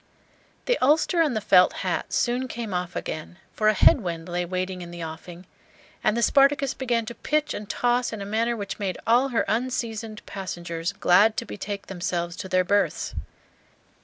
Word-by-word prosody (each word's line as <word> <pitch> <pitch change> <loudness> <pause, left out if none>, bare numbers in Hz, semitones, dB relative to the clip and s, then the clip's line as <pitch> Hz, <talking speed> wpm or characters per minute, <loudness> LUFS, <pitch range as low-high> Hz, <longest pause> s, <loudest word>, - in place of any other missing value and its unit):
The - - +1
ulster 315 +5 +3
and 300 -7 +1
the - - +1
felt 180 -2 +5
hat - - -2
soon 250 +1 0
came 230 -5 -5
off 180 0 -3
again, 155 +2 -5 0.2
for 215 - +1
a 215 - +4
head 240 - +6
wind 170 -3 -4
lay 175 0 -2
waiting 185 +1 -3
in 175 - -8
the 170 -1 -7
offing, 170 +3 -9 0.6
and 215 +1 +2
the 235 - +1
"Spartacus" 275 0 +4
began 240 -3 -1
to 235 - -6
pitch 300 +4 -1
and 205 -1 -7
toss 245 +1 +1
in 220 - -5
a 200 - -5
manner 230 +3 0
which 200 0 -5
made 190 -3 -2
all 245 +4 +4
her 235 - 0
unseasoned 225 -2 -3
passengers 170 -2 -4
glad 205 +3 +4
to - - -2
betake 200 - -6
themselves 175 -2 -3
to 190 - -6
their 185 0 +3
berths. 190 -3 0
205 Hz, 185 wpm, -25 LUFS, 180-240 Hz, 0.6 s, head